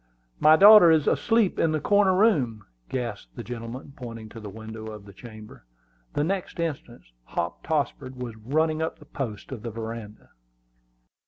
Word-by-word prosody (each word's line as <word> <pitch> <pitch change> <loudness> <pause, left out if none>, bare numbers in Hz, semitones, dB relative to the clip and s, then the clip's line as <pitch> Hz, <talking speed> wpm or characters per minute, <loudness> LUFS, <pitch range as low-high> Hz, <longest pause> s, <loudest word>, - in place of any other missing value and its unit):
"My 155 +1 +7
daughter 205 0 +9
is 160 -2 +4
asleep 225 -4 +2
in 165 - +2
the 155 - 0
corner 200 +3 +3
room!" 135 - +2 0.2
gasped 110 - -5
the - - -6
gentleman, 120 +3 -7
pointing 115 -3 -8
to 115 - -10
the 105 -2 -8
window 110 +1 -9
of 105 -2 -9
the 100 - -13
chamber. 110 -2 -12 0.5
The 145 - 0
next 185 +1 -3
instant 145 -7 -4 0.2
Hop 85 +6 -4
Tossford 140 -4 -2
was 125 -3 -6
running 155 +8 0
up 160 - -3
the - - -16
posts 115 -5 -6
of 125 -5 -6
the 115 - -5
veranda. 110 -1 -8
125 Hz, 165 wpm, -25 LUFS, 110-160 Hz, 0.5 s, daughter